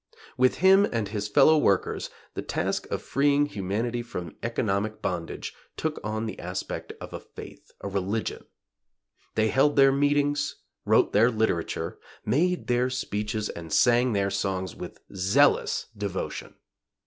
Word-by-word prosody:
With 130 0 +3
him 195 +1 +7
and 115 -3 -1
his 105 0 -3
fellow 145 +8 +5
workers 100 -9 +1 0.2
the - - -4
task - - -2
of - - -3
freeing 145 +1 +2
humanity 115 0 -2
from 90 -9 -7
economic 110 -2 -1
bondage 85 -3 -4 0.2
took 155 -1 -2
on 110 +1 -2
the 110 - -6
aspect 90 +1 -5
of - - -9
a - - -4
faith, - - -12
a - - -4
religion. 100 +3 -2 0.9
They 110 0 +2
held 135 +6 +3
their 135 -1 +6
meetings; 145 +1 +1 0.3
wrote - - +3
their 110 +4 +5
literature; 110 -7 -1 0.3
made 175 +10 +1
their 125 +1 +1
speeches 105 -4 -2
and 80 -2 -8
sang 120 +5 +4
their 100 -1 +1
songs 95 -2 -2
with - - -8 0.2
zealous 95 0 +3
devotion. 100 -2 -4
110 Hz, 140 wpm, -26 LUFS, 100-135 Hz, 0.9 s, him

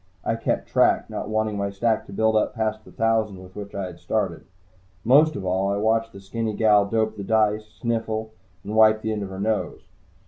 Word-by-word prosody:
I - - +1
kept 115 - -2
track, - - +2
not - - -4
wanting 110 -1 0
my 100 0 -1
stack 110 +3 0
to - - -11
build 110 +2 +1
up 110 - +1
past 110 -1 -2
the - - -15
thousand 110 -3 0
with 90 0 -15
which 100 -1 -8
I 100 - -2
had 90 -2 -9
started. - - -2 0.6
Most 145 +6 +5
of 95 - -5
all, 95 +2 0
I 100 - 0
watched 110 +2 +1
the 100 - -11
skinny 110 +2 -3
gal 105 -2 +4
dope 110 0 0
the 100 - -5
dice, 110 0 +1
sniffle 110 -1 -3 0.3
and 105 - -6
wipe 110 0 +5
the 110 - -1
end 105 -1 -2
of 100 - -5
her 95 0 -7
nose. 110 +1 -1
110 Hz, 215 wpm, -24 LUFS, 100-110 Hz, 0.6 s, Most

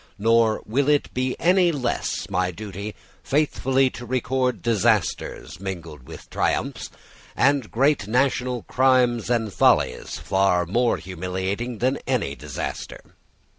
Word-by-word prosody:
Nor 115 +1 +3
will 135 +6 +1
it 145 -1 +1
be 130 0 -1 0.4
less 130 -6 -2
my 90 0 0
duty 100 +2 -7 0.3
faithfully 135 -2 +1
to 125 - -9
record 130 +1 -1
disasters 110 -7 0
mingled 85 -8 -7
with - - -11
triumphs, - - -1 0.5
and 140 -4 +2
great 135 -3 +2
national 125 0 0
crimes 125 -3 +2
and 115 -4 0
follies - - +2
far 95 -2 +1
more 120 +7 +1
humiliating 95 +6 -4
than 130 +5 0
any 125 - 0
disaster. 75 -1 -6
115 Hz, 115 wpm, -23 LUFS, 95-130 Hz, 0.5 s, Nor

